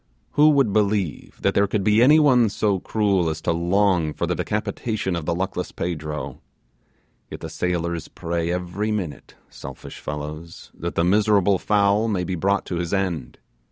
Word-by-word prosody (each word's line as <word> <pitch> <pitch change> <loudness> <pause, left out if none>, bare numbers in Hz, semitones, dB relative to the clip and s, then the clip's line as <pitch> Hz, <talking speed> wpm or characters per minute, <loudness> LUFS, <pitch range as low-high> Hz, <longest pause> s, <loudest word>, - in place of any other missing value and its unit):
Who 150 +1 +5
would 140 -9 +3
believe 100 -6 0
that - - +2
there 100 0 +3
could 100 0 -1
be 105 +3 +4
any 145 +5 +7
one 125 -7 +4
so 100 -1 0
cruel 100 -5 +1
as 80 -1 -3
to 85 - 0
long 85 -1 +1
for - - -1
the - - -1
decapitation 105 -2 -2
of 85 -2 -4
the 85 - +1
luckless 95 0 -3
Pedro; 75 -3 -5 0.9
yet - - -8
the - - -6
sailors 85 -2 -2
pray 85 0 -3
every 90 +4 -2
minute, 90 -9 -5
selfish - - -10
fellows, 75 +2 -7
that - - -5
the 85 - +2
miserable 100 0 +3
fowl 105 +1 +2
may 100 -5 0
be 95 - -3
brought 100 +3 0
to 90 - -3
his 85 +2 -1
end. 85 -10 -2
95 Hz, 170 wpm, -23 LUFS, 85-105 Hz, 0.9 s, any